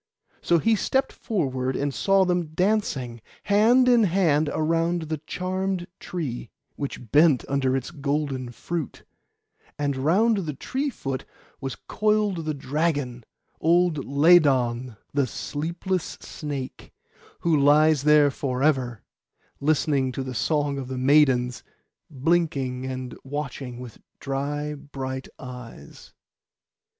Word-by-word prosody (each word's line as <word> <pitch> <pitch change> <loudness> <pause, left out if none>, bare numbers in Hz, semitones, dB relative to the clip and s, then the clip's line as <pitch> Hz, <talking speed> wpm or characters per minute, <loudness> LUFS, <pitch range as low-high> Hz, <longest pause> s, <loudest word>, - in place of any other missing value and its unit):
So 170 - +3
he 225 +7 +3
stepped 265 +5 0
forward 130 - -2
and 140 0 -1
saw 195 +4 +3
them 175 -2 0
dancing, 155 - 0 0.2
hand 225 +5 +4
in 240 -3 +5
hand 160 -5 +2
around 165 +2 0
the 155 -1 -4
charmed 185 0 -2
tree, 135 -10 -5 0.3
which 135 -5 -6
bent 150 -3 +5
under 135 -1 +1
its 135 +5 -5
golden 140 -4 -2
fruit; 165 +5 -5 0.7
and 145 -1 -1
round 195 - +3
the 160 -7 -3
tree 270 - -2
foot 135 - -4 0.4
was 135 -1 -4
coiled 210 -5 0
the 155 -1 -2
dragon, 140 -4 -2 0.3
old 170 -3 +3
Ladon 135 -6 +4 0.2
the 140 -2 +2
sleepless 170 - -3
snake, 140 -4 -6 0.5
who 170 -2 +2
lies 150 +1 +5
there 150 -1 +5
for 130 -1 -2
ever, 130 -7 +1 0.6
listening 140 -3 +1
to 135 - -3
the 130 -1 -5
song 145 +2 0
of 130 - -6
the 130 0 -5
maidens, 130 -2 +3 0.5
blinking 135 -4 0
and 130 -1 -5
watching 135 -3 -5
with 125 -3 -10 0.2
dry 145 +2 -3
bright 135 -2 -6
eyes. 125 - -11
145 Hz, 120 wpm, -25 LUFS, 130-170 Hz, 0.7 s, in